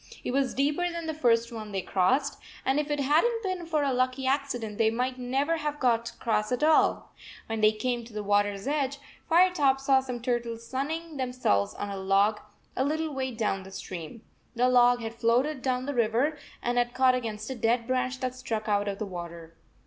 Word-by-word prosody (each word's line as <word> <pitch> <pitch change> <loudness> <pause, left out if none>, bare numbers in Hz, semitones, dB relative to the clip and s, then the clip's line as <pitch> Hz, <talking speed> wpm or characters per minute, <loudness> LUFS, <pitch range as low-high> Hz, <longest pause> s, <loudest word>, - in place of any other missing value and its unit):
It - - -2
was 270 0 0
deeper 295 +6 +1
than 340 -1 -5
the 320 - -2
first 235 -5 +2
one 215 -2 -7
they 195 -2 -2
crossed, 260 +10 +1 0.3
and 265 +2 +2
if 300 0 -2
it 295 0 -1
had 295 +4 +3
n 475 - +3
t 375 -2 0
been 345 -2 -8
for 310 -3 +1
a 275 -2 +1
lucky 255 +1 0
accident, 260 -6 -1
they 220 -1 +4
might 250 +3 -2
never 270 +6 0
have 295 -1 -3
got 235 -2 +2
across 215 0 -1
at 250 +3 0
all. 315 0 +3 0.3
When 225 -1 -3
they 215 0 +6
came 240 +2 -2
to 235 - -13
the 210 0 -4
water 205 0 +2
s 195 0 -9
edge, 280 -1 0 0.3
Firetop 330 -6 +4
saw 270 0 +4
some 250 -2 -5
turtles 235 -1 -2
sun 265 +3 -2
ning 325 -1 -5
themselves 245 - 0
on 205 - -4
a 200 - -4
log 195 +2 +2 0.4
a 260 - +1
little 310 +2 -1
way 265 -1 -2
down 220 -5 -1
the 190 - -11
stream. 185 +2 -8 0.3
The 250 +2 +3
log 245 -1 +5
had 225 0 -4
floated 245 +5 +1
down 255 -1 -1
the 285 - -2
84 240 -3 +3 0.2
river 305 +1 -1 0.3
and 245 0 +1
had 240 0 -1
caught 260 0 +5
against 225 -2 -3
a - - -3
dead 230 +1 +1
branch 255 +1 -1
that 255 -1 -1
stuck 225 -4 -4
out 205 -1 +1
of 200 -1 -2
the 215 - -3
water. 170 -3 -8
250 Hz, 220 wpm, -28 LUFS, 220-275 Hz, 0.4 s, they